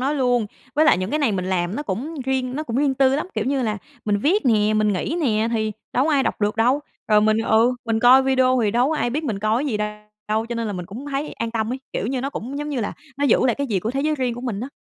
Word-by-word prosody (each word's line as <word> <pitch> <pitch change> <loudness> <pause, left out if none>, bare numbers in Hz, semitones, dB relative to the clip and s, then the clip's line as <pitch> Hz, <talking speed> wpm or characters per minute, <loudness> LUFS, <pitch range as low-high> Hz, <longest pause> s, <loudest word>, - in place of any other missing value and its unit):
nói 275 +4 0
luôn 245 -5 +1 0.3
với 310 +2 +4
lại 300 - +5
những 185 +2 -3
cái 300 - 0
này 280 -8 +2
mình 185 -2 -2
làm 185 +1 -1
nó 295 - -2
cũng 280 - -4
riêng 260 0 -1
nó 305 - -2
cũng 240 -5 -4
riêng 280 -1 +2
tư 265 0 +3
lắm. 305 - -2
Kiểu 220 - -1
như 270 +1 0
là 215 -2 -1 0.3
mình 205 -1 +1
viết 345 - +2
nè, 215 -2 +3
mình 215 -1 +2
nghĩ 260 - -2
nè, 225 -5 +1
thì 220 -1 0 0.2
đâu 255 - +2
có 320 - +1
ai 275 - +3
đọc - - -2
được 210 +1 0
đâu 250 +6 +3 0.3
rồi 210 -1 +5
mình, 215 +1 +3
ừ, 225 +2 +3
mình 225 -1 0
coi 255 +3 +7
video 260 -1 +3
thì 210 - +2
đâu 245 +4 +2
có 320 - 0
ai 240 - 0
biết 300 +6 -2
mình 220 -8 -2
coi 215 +5 +1
cái - - -2
gì 215 - 0
đ 210 - -1 0.5
đâu, 220 +1 0
cho 235 - -4
nên 230 -1 -2
là 210 - -3
mình 180 -2 -5
cũng 240 +10 -8
thấy 280 +2 -3
an 230 0 -4
tâm 225 0 -2
ấy, 260 - -3
kiểu 205 - -2
như 255 0 -1
nó 275 - -3
cũng, 270 +2 -5
giống 295 0 -4
như 280 -4 -2
là, 210 - -2 0.3
nó 285 - +1
giữ 275 - +4
lại 240 - +2
cái 280 - -2
gì 205 -7 0
của 220 - -2
thế 270 +2 -2
giới 305 +2 +1
riêng 255 -4 -1
của 245 - -7
mình 235 -5 -3
á. 250 - -4
245 Hz, 315 wpm, -22 LUFS, 215-275 Hz, 0.5 s, coi